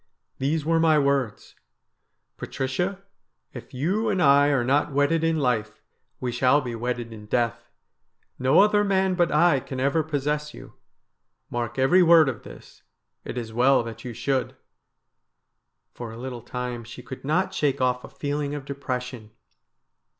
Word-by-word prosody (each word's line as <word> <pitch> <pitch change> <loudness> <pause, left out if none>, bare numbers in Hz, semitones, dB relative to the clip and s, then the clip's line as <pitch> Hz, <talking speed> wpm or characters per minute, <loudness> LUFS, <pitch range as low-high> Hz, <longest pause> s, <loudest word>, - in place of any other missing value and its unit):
These 150 +3 -1
were 165 0 +2
my 160 -1 +4
words: 140 -6 -1 0.3
— - - -52
" - - -53
Patricia, 180 +9 -3 0.5
if - - -10
you 190 - -1
and 195 -3 0
I 140 -2 +5
are 140 -4 +2
not 145 +4 +1
wedded 145 +4 +1
in 165 0 +1
life, 115 -7 -1 0.4
we 125 -1 -2
shall 125 +4 +3
be 125 -4 -5
wedded 120 0 -4
in 105 -1 -11
death. 115 +1 -1 0.7
No 130 +7 +5
other 210 0 +4
man 190 -2 +1
but 175 -2 +1
I 155 -1 +4
can 130 0 -7
ever 140 +4 +2
possess 150 0 -2
you. - - -12 0.8
Mark 120 0 -3
every 135 +8 +4
word 165 -4 +6
of 120 - -6
this. - - -14 0.4
It - - -6
is 115 -2 -5
well 125 +2 +4
that 115 0 -8
you 125 - -6
should.'" 130 +3 -2 0.7
' - - -55
For 120 -2 -7
a 115 - -10
little 125 -1 -6
time 125 0 -5
she 120 +2 -11
could 130 +1 -9
not 155 +7 0
shake 145 -3 0
off 125 -1 0
a - - -10
feeling 145 0 -3
of 140 -2 -7
de 140 - -5
pression. 125 -4 -5
135 Hz, 170 wpm, -25 LUFS, 125-155 Hz, 0.8 s, word